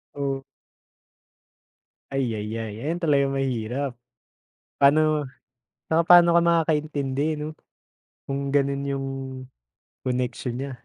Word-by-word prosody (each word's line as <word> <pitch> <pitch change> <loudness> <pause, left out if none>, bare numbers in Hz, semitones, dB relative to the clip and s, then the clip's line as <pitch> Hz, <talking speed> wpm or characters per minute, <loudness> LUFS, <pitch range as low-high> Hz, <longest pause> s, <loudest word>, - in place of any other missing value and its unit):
Oh. 135 -1 -2 1.7
Ay-yay-yay, 110 -4 -3
ayan 165 +4 -2
talaga 145 -5 +3
mahirap. 135 0 -2 0.9
Pa'no 150 +1 +4 0.6
'tsaka 160 +1 +3
pa'no 175 0 +8
ka 170 - +5
makakaintindi 155 -3 +1
'no? 150 +1 -5 0.7
Kung 140 0 -2
ganun 140 -1 +2
yung 135 -1 -2 1.0
connection 125 -1 -2
niya. 135 +1 -4
140 Hz, 90 wpm, -25 LUFS, 130-155 Hz, 1.7 s, pa'no